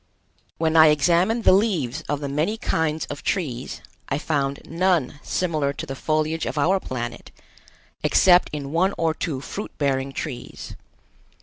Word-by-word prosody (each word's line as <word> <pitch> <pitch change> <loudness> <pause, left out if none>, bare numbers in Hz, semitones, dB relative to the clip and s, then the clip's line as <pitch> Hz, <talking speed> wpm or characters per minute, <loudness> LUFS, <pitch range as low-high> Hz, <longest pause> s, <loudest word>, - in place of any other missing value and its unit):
When 160 0 0
I 160 -1 +8
examined 175 - +3
the - - +6
leaves 175 - +1
of 145 0 -1
the 140 - -3
many 155 +10 -1
kinds 160 - -1
of 145 - -6
trees, 135 -10 -3 0.3
I 140 - 0
found 140 -2 -1
none 165 -5 0
similar 155 -6 -1
to - - -6
the 135 - -6
foliage 155 +3 -1
of - - -4
our 185 +7 +3
planet, 120 -6 -6 0.7
except 180 -1 +5
in 140 -2 -5
one 185 +5 +2
or 165 -1 +1
two 155 -5 -3
fruit 205 +8 -6
bearing 135 -1 0
trees. 135 -3 -6
155 Hz, 150 wpm, -23 LUFS, 140-175 Hz, 0.7 s, I